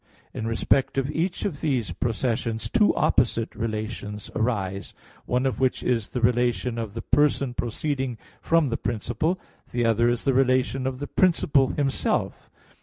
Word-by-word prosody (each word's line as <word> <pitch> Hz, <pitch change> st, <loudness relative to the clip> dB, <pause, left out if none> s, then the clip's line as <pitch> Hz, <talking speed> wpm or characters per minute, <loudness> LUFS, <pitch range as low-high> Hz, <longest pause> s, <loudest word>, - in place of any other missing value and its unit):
In 110 Hz, -, -4 dB
respect 125 Hz, +4 st, +1 dB
of 135 Hz, +2 st, 0 dB
each 175 Hz, +3 st, -1 dB
of 155 Hz, -8 st, -3 dB
these 130 Hz, -8 st, 0 dB
processions 115 Hz, -1 st, -1 dB
two 205 Hz, -, +4 dB
opposite 115 Hz, -2 st, +1 dB
relations 105 Hz, -2 st, -4 dB
arise; 100 Hz, -4 st, -2 dB, 0.3 s
one 125 Hz, +2 st, +1 dB
of 130 Hz, -, -1 dB
which 130 Hz, -1 st, +1 dB
is 115 Hz, -5 st, 0 dB
the 125 Hz, -, -4 dB
relation 120 Hz, 0 st, +1 dB
of 110 Hz, -2 st, -5 dB
the 115 Hz, -, -4 dB
person 140 Hz, -2 st, +2 dB
proceeding 130 Hz, +1 st, -2 dB, 0.2 s
from 165 Hz, -4 st, +3 dB
the 115 Hz, -, -1 dB
principle; 120 Hz, -, -1 dB, 0.3 s
the 120 Hz, -1 st, 0 dB
other 115 Hz, +1 st, +3 dB
is 120 Hz, -1 st, -1 dB
the 135 Hz, -, +2 dB
relation 130 Hz, 0 st, +2 dB
of 130 Hz, -1 st, -3 dB
the 145 Hz, -, -4 dB
principle 145 Hz, -5 st, +3 dB
Himself. 135 Hz, 0 st, -1 dB
125 Hz, 155 wpm, -25 LUFS, 115-135 Hz, 0.3 s, two